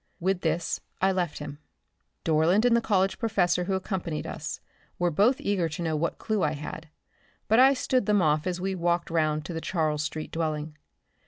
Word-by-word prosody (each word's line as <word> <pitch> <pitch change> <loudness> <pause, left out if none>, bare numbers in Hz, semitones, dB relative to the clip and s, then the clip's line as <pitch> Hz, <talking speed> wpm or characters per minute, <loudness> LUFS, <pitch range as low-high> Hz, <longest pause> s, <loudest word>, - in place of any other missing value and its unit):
With 185 +1 0
this 165 0 -1 0.2
I 190 +1 +3
left 180 -4 -1
him. 145 -1 -7 0.7
Dorland 165 +8 +3
and 240 -1 +5
the 235 - +3
College 195 -3 +1
professor 180 -6 +1
who 190 - 0
accompanied 185 -5 -3
us - - -5 0.4
were 175 -1 +1
both 215 - +3
eager 185 -5 0
to 155 +3 -5
know 160 -1 0
what 165 +2 -1
clue 215 -3 -1
I 150 - +1
had, 150 +2 -7 0.6
but 220 +3 +4
I 270 +2 +7
stood 255 -3 0
them 210 -1 +4
off 155 -1 +2
as 180 -1 -2
we 190 +1 -1
walked 175 -1 0
round 155 -2 +1
to 175 - -5
the 165 - -4
Charles 155 -4 0
street 155 +1 -4
dwelling. 155 -2 -2
175 Hz, 190 wpm, -27 LUFS, 155-195 Hz, 0.7 s, I